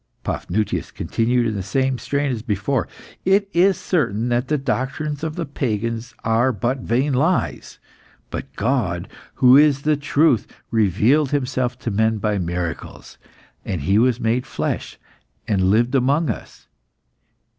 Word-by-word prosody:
Paphnutius 105 +3 -2
continued 120 +1 0
in 110 - 0
the 100 - -3
same 130 +5 0
strain 140 +3 -1
as 115 -3 -3
before 110 +4 -1 0.4
"It 195 +2 +3
is 185 +2 +4
certain 120 - 0
that 120 +1 0
the 150 - +1
doctrines 140 +3 -2
of 160 -1 -3
the 170 - -3
pagans 115 -3 -3
are 115 +4 +2
but 120 +4 -1
vain 130 +4 0
lies. 160 +8 0 0.5
But - - -5
God, 105 -8 -1 0.3
who 125 0 +6
is 145 -1 +5
the 155 0 +3
truth, 145 -4 +2 0.2
revealed 115 - +3
Himself 130 -3 -1
to 115 - -2
men 110 +2 +2
by 105 -1 -1
miracles, 85 -2 -5 0.4
and 90 -6 -3
He 100 +9 +3
was 125 0 +2
made 120 +2 0
flesh, - - -3 0.5
and 95 -3 +2
lived 120 +5 +2
among 140 +4 +2
us." - - -10
125 Hz, 145 wpm, -21 LUFS, 110-140 Hz, 0.5 s, who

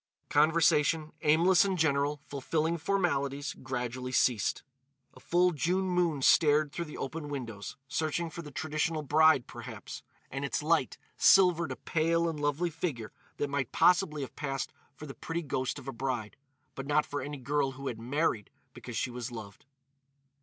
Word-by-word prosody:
Conversation, 155 0 +3
aimless 165 +5 +5
and 195 -2 -1
general, 145 -2 +1
fulfilling 160 +4 -1
formalities, 145 -7 0
gradually 125 -1 -4
ceased. 120 -5 +1 0.5
A - - -15
full 180 +6 +2
June 180 +5 0
moon 175 -6 +1
stared 150 -1 +4
through 170 +3 -4
the 150 - -9
open 150 +2 -5
windows—searching 140 +6 -4
for 170 - -6
the 150 - -9
traditional 155 +2 -2
bride, 155 -2 +4
perhaps—and 135 +1 -9
its 140 +1 -2
light 160 -4 +1 0.2
silvered 180 -3 +5
a - - -3
pale 165 +1 +1
and 160 -2 -3
lovely 145 +4 0
figure 140 -9 -4 0.3
that 145 -1 -2
might 140 -4 -1
possibly 175 -5 +3
have 130 - -9
passed 135 -2 -3 0.2
for 150 - -9
the 135 - -8
pretty 170 +4 -4
ghost 130 -2 -2
of 135 -2 -10
a 135 - -4
bride, 120 -4 -3 0.4
but 135 0 -7
not 150 +1 +2
for 145 - -4
any 145 +2 -5
girl 140 +1 0
who 135 +1 -9
had 120 -4 -3
married 120 -3 -1 0.2
because - - -7
she 130 - -1
was 125 0 -5
loved. 110 0 -10
145 Hz, 160 wpm, -30 LUFS, 135-165 Hz, 0.5 s, aimless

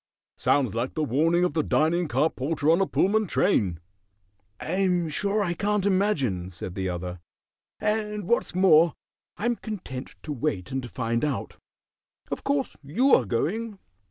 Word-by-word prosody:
"Sounds 135 -7 +2
like 120 +3 -2
the 155 - 0
warning 160 +6 +2
of 180 - +1
the 160 - +2
dining 165 +3 +1
car 155 +2 +2
porter 150 +3 0
on 170 +4 +3
a 195 - +2
Pullman 215 +2 +2
train." 100 - +1 0.8
"I'm 180 -1 0
sure 205 +6 0
I 175 -3 -1
can't 205 +1 0
imagine," 150 - +1
said 90 0 -7
the 95 0 -2
other; 90 0 -5 0.6
"and 210 -2 -1
what's 235 -5 +1
more, 170 -3 +5 0.4
I'm 240 +3 0
content 155 -12 -7
to 150 - -4
wait 120 -6 -2
and 130 -2 -3
find 115 -2 -1
out. 150 -2 -2 0.7
Of - - -3
course 280 -1 -1
you 235 - +2
are 125 - +5
going?" 200 - -2
165 Hz, 155 wpm, -26 LUFS, 130-200 Hz, 0.8 s, more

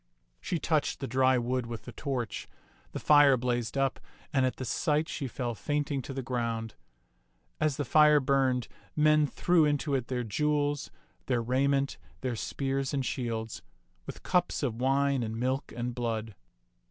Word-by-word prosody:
She - - -2
touched - - 0
the - - -3
dry 130 +1 +3
wood 125 0 -1
with 115 -1 -6
the 125 - -7
torch; 125 -2 -4 0.4
the - - -5
fire 145 -3 +6
blazed 120 0 -1
up, 135 -1 +1 0.3
and 130 -2 +3
at 130 - -2
the 130 - -5
sight 150 +5 +1
she 140 -5 -4
fell 120 -1 -3
fainting 145 +5 -1
to 135 - -8
the 135 0 -4
ground. 115 -3 -2 0.9
As 155 -3 +1
the 145 - -1
fire 150 +2 +6
burned, 130 -3 +1 0.3
men 150 0 +4
threw 175 +3 +3
into 145 0 +1
it 130 -3 0
their 125 -1 -2
jewels, 145 +5 0 0.4
their 120 -3 +1
rai 130 +4 +2
ment, 140 0 0 0.2
their 125 -2 -2
spears 135 +3 -2
and 135 -2 -1
shields, 115 -4 -3 0.5
with - - -8
cups 180 -3 +1
of 120 -3 -2
wine 135 0 +2
and 110 0 -3
milk 130 +3 -1
and 120 +1 -2
blood. 115 -2 -3
130 Hz, 165 wpm, -29 LUFS, 120-145 Hz, 0.9 s, fire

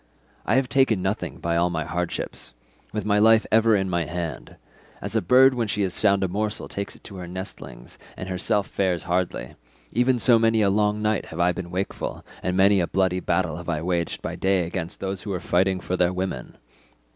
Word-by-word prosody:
I - - +3
have 130 -1 +2
taken 125 -8 +2
nothing 95 - -2
by 85 0 -1
all 85 +1 +2
my 80 -2 -2
hardships—with 85 - -5
my 105 0 +3
life 110 +1 +5
ever 115 0 +5
in 95 -1 0
my 85 -2 0
hand; 85 -1 -5 0.4
as - - -4
a - - +3
bird 130 +8 +6
when 120 -3 -1
she 105 0 0
has 95 -2 -1
found 100 -2 +3
a - - +2
morsel 105 +3 -2
takes 100 0 -5
it - - -19
to 100 - -10
her 90 -1 -7
nestlings, 90 -8 -9 0.2
and 95 - -6
herself 100 +2 0
fares 90 -3 -1
hardly, 90 0 -2 0.4
even 125 +2 +2
so 120 -1 +5
many 115 -1 +3
a 100 - +3
long 105 +1 +1
night 110 -1 0
have 80 - -8
I 90 +1 +4
been 90 0 -6
wakeful, 95 +3 -4 0.2
and 90 0 -1
many 100 +1 +5
a 85 - +1
bloody 95 -1 +1
battle 85 -2 0
have 85 0 -7
I 80 -2 -1
waged 85 -1 -1
by - - -3
day 95 -2 +1
against 90 +2 -5
those 95 -1 -3
who - - -7
were 95 -2 -2
fighting 95 +2 +1
for 90 - -3
their 90 -1 +2
women. 90 -9 -4
95 Hz, 210 wpm, -24 LUFS, 90-105 Hz, 0.4 s, bird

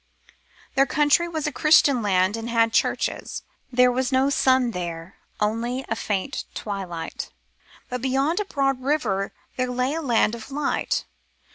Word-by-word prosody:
Their 275 +1 +4
country 300 +3 +3
was 315 -3 -3
a 300 - 0
Christian 290 -5 +4
land 190 -1 +2
and 225 +1 -5
had 230 -1 +2
churches. - - -1 0.3
There 250 0 +5
was 255 +1 -1
no 265 +2 +3
sun 260 -2 +3
there, 170 -2 -6 0.2
only 235 +5 -1
a 225 - 0
faint 205 -4 -2
twilight; 190 -5 -5 0.6
but 250 -1 -4
beyond 270 +7 +1
a 415 - -1
broad 270 -6 0
river 235 -9 0 0.3
there 255 -1 0
lay 250 +3 0
a 325 - -2
land 235 -6 +2
of 235 +1 -7
light. 285 +1 -1
250 Hz, 150 wpm, -24 LUFS, 215-275 Hz, 0.6 s, There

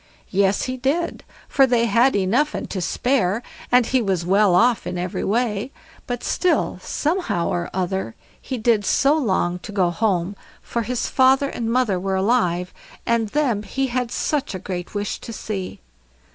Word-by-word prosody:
Yes, 195 +1 +2
he 255 0 -3
did, 280 +7 -1 0.2
for 270 -1 +4
they 240 -2 +2
had 235 +4 +3
enough 225 +10 +1
and - - -4
to 190 - -2
spare, 230 +1 0 0.3
and 250 -1 +5
he 260 +1 +1
was 190 -5 -1
well 195 0 +4
off 235 +4 +3
in 180 - -3
every 180 0 -3
way, 220 +2 0 0.4
but 245 -1 -4
still 365 - +1
somehow 310 - -1
or 175 0 -2
other 185 - -2 0.3
he 260 - -4
did 225 -2 +2
so 275 +8 +3
long 190 - 0
to 210 - -9
go 185 -4 +1
home, 190 -1 0 0.3
for 235 - -2
his 245 +2 -2
father 265 +1 +4
and 230 -3 -3
mother 235 -7 +1
were 190 +1 -1
alive, 190 -4 +1 0.3
and 230 -2 +1
them 255 -6 +1
he 265 +6 -2
had 250 -2 0
such 280 -4 -1
a - - -2
great 180 0 -6
wish 205 0 -2
to 230 - -8
see. 200 -4 -5
220 Hz, 175 wpm, -22 LUFS, 190-255 Hz, 0.4 s, and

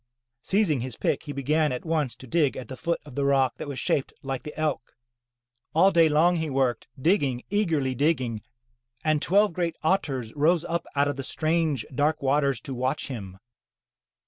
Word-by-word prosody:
Seizing 190 -7 +2
his 125 -2 -5
pick, - - 0
he 145 - -5
began 150 +2 +1
at 125 - -4
once 155 -6 0
to - - -12
dig 145 +1 +1
at 125 - -7
the 130 - -5
foot 170 +6 -1
of 145 - -11
the 140 - -1
rock 135 -3 +2
that - - -6
was 140 -2 -5
shaped 135 - 0
like 135 -1 -3
the 150 0 -9
Elk. 150 -6 -2 0.8
All 185 +4 +6
day 165 -3 +5
long 170 +4 +4
he 160 -1 -2
worked, 130 -3 0
digging, 140 -6 +1
eagerly 160 -11 +1
digging, 130 -5 0 0.6
and 155 -1 +2
twelve 205 +1 +3
great 170 -1 -1
otters 140 - 0
rose 160 +3 +2
up 170 +1 -2
out 140 0 +3
of 145 -2 -2
the 135 - -4
strange, 155 -4 0
dark 145 +4 +1
waters 140 -2 +2
to 135 - -6
watch 130 +3 -2
him. 100 -7 -7
145 Hz, 185 wpm, -26 LUFS, 130-160 Hz, 0.8 s, All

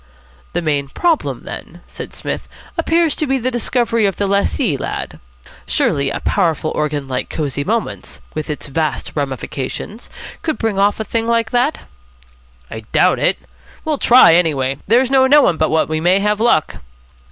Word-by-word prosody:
"The 175 - -1
main 145 -3 0
problem, 335 - 0
then," - - -9
said - - -8
Psmith, - - -5 0.3
"appears 335 -2 +2
to 305 - -1
be 270 0 +1
the 255 +1 -1
discovery 235 -2 +1
of 195 - -2
the 200 - -1
lessee, 200 - +1
lad? - - -5 0.5
Surely 140 -1 +1
a - - -3
powerful 160 -2 0
organ 150 -2 -2
like 130 -1 -3
Cosy 145 -2 -2
Moments, 225 +7 -3
with 155 0 -4
its 150 - -4
vast 155 +2 -2
ramifications, 140 - -4 0.3
could 315 -2 -2
bring 220 -4 -1
off 205 +2 +2
a - - -1
thing 225 +2 -2
like 230 -1 +1
that?" 250 +5 +1 0.9
"I 110 - -5
doubt - - +3
it. - - +2 0.5
We'll 305 -3 -1
try, 240 -8 +7
anyway. 140 -6 +2
There's 245 +5 +3
no 265 -1 +5
knowing 275 - +5
but 155 - +1
what 160 0 +2
we 155 0 -2
may 180 +3 +4
have 210 +1 +1
luck." 220 -9 +2
200 Hz, 165 wpm, -18 LUFS, 155-245 Hz, 0.9 s, try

